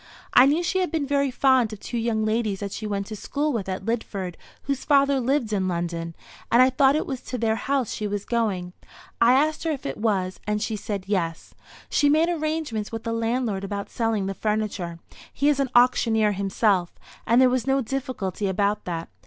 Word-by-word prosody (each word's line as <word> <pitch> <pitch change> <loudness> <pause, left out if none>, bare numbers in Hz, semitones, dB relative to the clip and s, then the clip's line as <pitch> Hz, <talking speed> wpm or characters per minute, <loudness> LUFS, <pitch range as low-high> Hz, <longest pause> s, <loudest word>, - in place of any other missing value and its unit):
I 255 - +8
knew 310 +5 +2
she 375 +2 0
had 365 - 0
been 320 -4 -1
very 280 0 +1
fond 255 -3 +3
of 215 - -8
two 240 - -4
young 225 -1 0
ladies 215 -3 -1
that 200 -1 -4
she 215 - -5
went 200 -1 -2
to 215 - -7
school 290 +7 -2
with 200 -5 -3
at 190 0 -4
Lidford, 205 -5 -3 0.3
whose 275 -1 -2
father 280 -2 +3
lived 250 -3 0
in 190 -2 0
London; 170 -1 -3 0.4
and 235 - +5
I 255 +1 +6
thought 270 +1 +4
it 310 - 0
was 265 -3 -5
to 250 - -5
their 225 -1 +1
house 270 0 -1
she 210 - -3
was 205 -1 -3
going. 200 -7 -1 0.5
I 235 +1 +6
asked 300 +3 +2
her 330 - -1
if 295 -4 -3
it 135 - -3
was, 195 -4 -1
and 210 0 0
she 220 +1 -2
said 205 -2 -4
yes. 175 -5 -2 0.3
She 290 - +2
made 315 +3 +3
arrangements 310 -9 -2
with 225 -1 -5
the 230 - -2
landlord 230 -3 -1
about 200 0 -5
selling 225 -4 0
the 195 - -2
furniture. 210 -5 -2 0.3
He 285 - +1
is 285 -2 +2
an 275 -2 +1
auctioneer 230 -3 +4
himself, 195 -2 0 0.3
and 235 +2 +5
there 260 - +7
was 255 0 0
no 270 0 +3
difficulty 235 -7 -3
about 200 +2 0
that. 165 -2 -4
225 Hz, 210 wpm, -24 LUFS, 200-270 Hz, 0.5 s, I